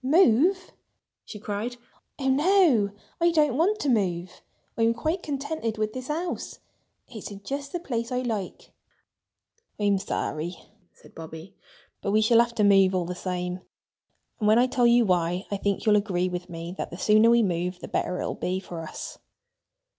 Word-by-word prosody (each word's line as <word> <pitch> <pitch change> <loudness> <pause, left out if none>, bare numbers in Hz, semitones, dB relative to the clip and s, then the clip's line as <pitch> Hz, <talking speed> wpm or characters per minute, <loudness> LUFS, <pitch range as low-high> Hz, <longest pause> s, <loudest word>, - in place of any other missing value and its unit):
"Move!" 340 - +4 0.5
she 215 - -9
cried. 210 +4 -4 0.4
"Oh, 270 - -2
no! 290 - +4 0.3
I 340 0 +4
don't 300 -6 +2
want 370 +9 +2
to - - -1
move. 185 -7 0 0.3
I'm 230 0 +2
quite 315 +9 -1
contented 280 -6 -3
with 215 0 -1
this 255 0 -6
house. 335 +4 -3 0.5
It's 220 -5 -8
in 200 -1 -10
just 280 +4 -4
the 350 - -3
place 235 -8 -3
I 250 0 0
like." 215 -6 -4 1.1
"I'm 205 -2 +2
sorry," 175 -3 -3 0.3
said - - -20
Bobby. 160 +3 -10 0.5
"But 200 - -1
we 215 - +4
shall 230 +1 +5
have 235 0 +2
to 215 - +2
move 195 -2 +5
all 180 -2 0
the 180 - -4
same. 180 0 -3 0.8
And 210 - +1
when 215 +1 +6
I 245 - +5
tell 250 -1 +2
you 235 0 +5
why, 180 0 +1
I 200 - 0
think 200 +2 -1
you'll 210 -1 +5
agree 185 -3 0
with 180 0 -5
me 170 +1 -6
that - - -3
the 175 - -8
sooner 215 +3 +5
we 235 0 +5
move 180 -1 -1
the - - -9
better 180 - -2
it - - -2
will - - -2
be 185 +1 -2
for 175 -3 -7
us." 160 - -8
215 Hz, 180 wpm, -26 LUFS, 185-260 Hz, 1.1 s, when